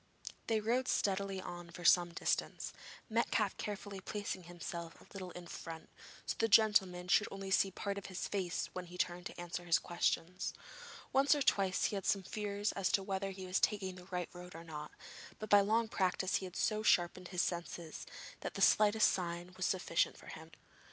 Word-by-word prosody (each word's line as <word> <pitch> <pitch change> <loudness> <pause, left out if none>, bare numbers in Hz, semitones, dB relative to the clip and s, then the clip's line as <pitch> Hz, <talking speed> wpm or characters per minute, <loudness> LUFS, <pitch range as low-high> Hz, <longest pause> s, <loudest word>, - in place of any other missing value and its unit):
They 225 -1 +2
rode 240 +4 +1
steadily 195 -1 0
on 175 -2 -7
for 175 +1 -9
some 175 0 +6
distance, 170 - -1 0.3
Metcalfe 220 -3 +1
carefully 205 -1 -5
placing 205 -3 -4
himself 170 -1 -6
a - - -16
little 190 -2 -6
in 180 0 -8
front, 165 -1 -8 0.4
so - - -1
that - - -5
the 225 - +4
gentleman 195 -5 +4
should 205 +3 +4
only 195 -1 -6
see 195 0 +4
part 200 +1 -3
of 200 - -9
his 185 -1 -4
face 185 -4 -1
when 180 -1 -5
he 180 +1 -10
turned 175 0 -1
to - - -11
answer 175 0 -4
his 165 -2 +4
questions. 175 +4 -1 0.6
Once 275 +2 +5
or 290 - +1
twice 195 -6 +2
he - - 0
had 195 - -3
some 195 -1 +2
fears 205 +1 -2
as 195 -2 0
to 195 - +3
whether 195 0 -2
he 190 -1 -7
was 185 +2 +1
taking 195 -3 +1
the 180 -1 -12
right 180 -2 -3
road 180 -1 -10
or 165 - -8
not, 150 -2 -7 0.5
but 215 - -7
by 205 0 +9
long 220 +3 +2
practice 190 -2 +1
he 190 - -5
had 180 -1 -9
so 215 -1 +1
sharpened 180 -3 +3
his 180 -1 0
other 175 -1 -2
senses 165 -2 -8 0.3
that - - -5
the - - -3
slightest 215 +1 +6
sign 175 0 -3
was 185 - 0
sufficient 175 -3 +1
for - - -12
him. 160 +1 -9
185 Hz, 200 wpm, -35 LUFS, 175-205 Hz, 0.6 s, by